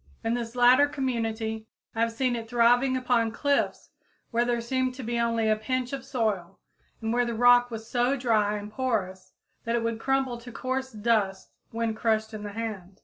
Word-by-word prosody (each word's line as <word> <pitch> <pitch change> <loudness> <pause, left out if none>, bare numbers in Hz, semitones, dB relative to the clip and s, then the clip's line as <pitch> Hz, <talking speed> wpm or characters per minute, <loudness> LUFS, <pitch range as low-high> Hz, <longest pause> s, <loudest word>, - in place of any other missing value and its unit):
In 225 +1 0
this 235 0 -4
latter 250 +3 +6
community 225 -5 -3 0.3
I 225 - -5
have 230 0 +2
seen 245 +1 0
it 225 -1 -6
thriving 245 +2 +3
upon 245 -3 +1
cliffs 285 +4 -1 0.4
where 235 0 +2
there 240 -1 0
seemed 255 +2 -1
to 260 - -7
be 235 +1 -2
only 230 -1 +1
a 215 - +4
pinch 250 +4 -2
of 270 -1 -4
soil, 205 -8 -2 0.4
and 225 +1 0
where 245 0 +3
the 235 -1 -2
rock 245 +1 +5
was 225 -1 -7
so 245 +3 +1
dry 215 -4 +2
and 205 +1 -8
porous 210 -7 -2 0.3
that 230 0 -1
it 235 - 0
would 230 -1 -2
crumble 270 -1 0
to 245 +1 -10
coarse 260 +2 -3
dust 210 -3 0 0.2
when 230 -1 -2
crushed 220 0 0
in 215 - -6
the 205 -1 -6
hand. 200 -4 -6
230 Hz, 195 wpm, -27 LUFS, 220-250 Hz, 0.4 s, latter